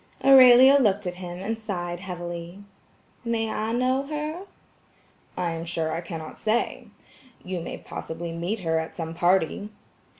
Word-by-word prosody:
Aurelia 265 0 +8
looked 205 -5 +2
at 180 - -2
him 175 -1 -6
and 220 +4 -4
sighed 175 -5 -4
heavily. 175 0 -7 0.6
"May 225 -2 -1
I 220 +1 -2
know 255 +3 +1
her?" 305 +5 -4 0.9
"I 175 -2 -1
am 165 0 -4
sure, 165 -1 -2
I 165 +2 -2
cannot 165 -2 -8
say. 225 +2 -1 0.6
You 180 -1 -4
may - - -6
possibly 165 +1 -6
meet 175 +6 -3
her 160 -2 +1
at 160 - -6
some 165 -1 -5
party." 180 +3 +1
185 Hz, 145 wpm, -25 LUFS, 170-225 Hz, 0.9 s, Aurelia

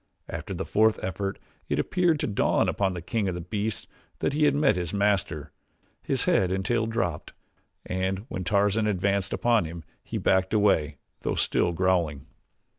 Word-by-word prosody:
After - - -5
the - - -3
fourth 110 +1 +3
effort 95 +1 -3 0.3
it - - 0
appeared 175 -4 +2
to - - +1
dawn 105 - +2
upon 95 -2 0
the 85 - -6
king 110 +1 -1
of 90 -1 -4
beasts 105 0 -2 0.3
that - - -1
he 150 +1 +3
had 145 -1 +3
met 145 -8 +3
his 90 +1 -3
master, 95 -7 0 0.5
his - - 0
head 95 -1 +3
and 95 0 -1
tail 115 0 +1
dropped 110 -9 -2 0.5
and 95 +2 -2
when 95 - -4
Tarzan 105 +3 +2
advanced 100 -1 0
upon 115 -6 +2
him 80 +1 -7 0.2
he - - -4
backed 95 +2 +2
away, 80 -9 +2 0.2
though - - -2
still - - +1
growling. 85 -5 0
95 Hz, 170 wpm, -27 LUFS, 90-110 Hz, 0.5 s, fourth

